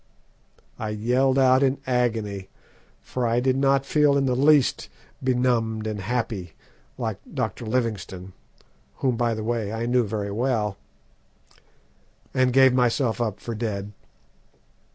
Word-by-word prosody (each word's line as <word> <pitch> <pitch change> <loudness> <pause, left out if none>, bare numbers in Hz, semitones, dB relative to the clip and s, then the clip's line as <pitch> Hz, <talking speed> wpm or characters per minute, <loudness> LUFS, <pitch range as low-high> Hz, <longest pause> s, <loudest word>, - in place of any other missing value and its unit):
I 110 - -3
yelled 125 +5 +1
out 130 0 +5
in 135 0 +2
agony, 110 -6 -1 0.5
for 125 -2 -2
I 115 +1 +2
did 130 +1 +1
not 135 0 +2
feel 145 0 +3
in 135 - +1
the 125 -2 +1
least 145 0 +3 0.3
benumbed 120 -4 +1
and 110 -1 -3
happy, 105 -5 -3 0.4
like - - -3
Dr. 115 - -3
Livingstone 100 -6 -3 0.6
whom, 130 -3 0
by 115 -1 0
the 110 - -4
way, 110 -2 -2
I 115 +1 -3
knew 125 +1 +2
very 100 -1 -3
well 110 -2 0 1.6
and 130 -1 +2
gave 130 0 +6
myself 125 -1 +1
up 110 -4 -2
for 115 - -5
dead. 105 -3 -4
120 Hz, 135 wpm, -24 LUFS, 110-130 Hz, 1.6 s, gave